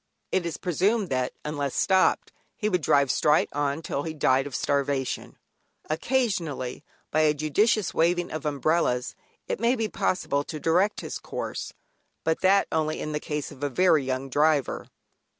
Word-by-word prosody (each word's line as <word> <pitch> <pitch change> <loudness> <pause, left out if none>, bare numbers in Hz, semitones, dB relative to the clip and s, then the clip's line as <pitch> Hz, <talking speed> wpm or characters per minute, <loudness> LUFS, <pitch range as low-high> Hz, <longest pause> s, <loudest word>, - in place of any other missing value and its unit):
It 180 -2 +1
is 165 - -4
presumed 195 +4 +1
that, 130 -1 -1
unless 145 -3 -2
stopped, 190 -1 +2 0.3
he 215 - -1
would 180 -4 +1
drive 140 -2 +3
straight 150 0 +3
on 145 +2 -1
till 140 - -2
he 160 +1 -5
died 135 -2 +2
of 135 - -7
starvation. 140 -2 -1 0.5
Occasionally, 165 - -1 0.3
by 155 - +2
a 155 -1 +4
judicious 190 +7 +1
waving 175 +2 +1
of 155 -1 -4
umbrellas 145 -3 0 0.3
it - - -2
may 235 +3 +3
be 225 -3 -1
possible 145 -8 0
to 155 - -6
direct 180 +7 +2
his - - -5
course, - - -5 0.5
but 160 0 0
that 195 +1 +4
only 155 -1 0
in 155 - -4
the 150 - -1
case 150 -1 -4
of 140 -2 -13
a 145 - +1
very 160 +1 +3
young 130 +1 -2
driver. 145 0 +1
155 Hz, 165 wpm, -26 LUFS, 140-180 Hz, 0.5 s, a